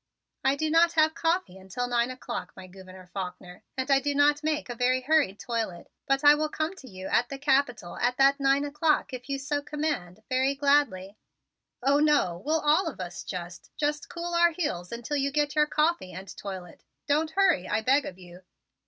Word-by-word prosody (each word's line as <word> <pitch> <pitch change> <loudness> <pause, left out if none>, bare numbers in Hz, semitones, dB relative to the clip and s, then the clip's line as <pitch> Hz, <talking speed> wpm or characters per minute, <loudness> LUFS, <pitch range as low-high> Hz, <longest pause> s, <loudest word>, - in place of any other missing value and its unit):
"I 270 +1 +3
do 310 +2 -1
not 335 +1 +4
have 315 -1 +3
coffee 330 - -1
until 190 +6 -4
nine 240 0 +1
o'clock, 255 -1 -6
my 190 - -9
Gouverneur 185 0 -13
Faulkner, 180 0 -7 0.2
and 260 +2 -1
I 270 - +6
do 285 +1 -2
not 290 +1 +3
make 305 -1 -1
a 245 - -4
very 250 +2 +1
hurried 280 -8 +2
toilet, 225 -8 -4 0.2
but 275 +1 +1
I 290 0 +9
will 305 +1 0
come 315 +4 -3
to 265 - -12
you 185 -1 -9
at 240 +4 +1
the 275 - -5
Capitol 265 - 0
at 245 +1 0
that 275 +1 +4
nine 275 +1 +2
o'clock 300 0 0
if 250 +1 -7
you 275 - -1
so 285 +1 -2
command 285 - -4
very 260 +2 +1
gladly." 275 -9 +1 0.7
"Oh, 280 +2 +4
no, 290 - +2
we'll 315 +1 +1
all 310 +5 +3
of 315 - -6
us 180 -1 -6
just 180 0 -7
just 295 0 -2
cool 345 0 -5
our 340 0 +5
heels 180 - -3
until 240 +5 -3
you 280 0 +1
get 290 0 0
your 300 -1 +3
coffee 305 - 0
and 190 +3 -9
toilet. 185 -4 -8 0.2
Don't 305 +2 +1
hurry, 385 - +3
I 220 - +1
beg 270 +5 +2
of 180 - -8
you! 180 -1 -13
275 Hz, 200 wpm, -27 LUFS, 195-300 Hz, 0.7 s, I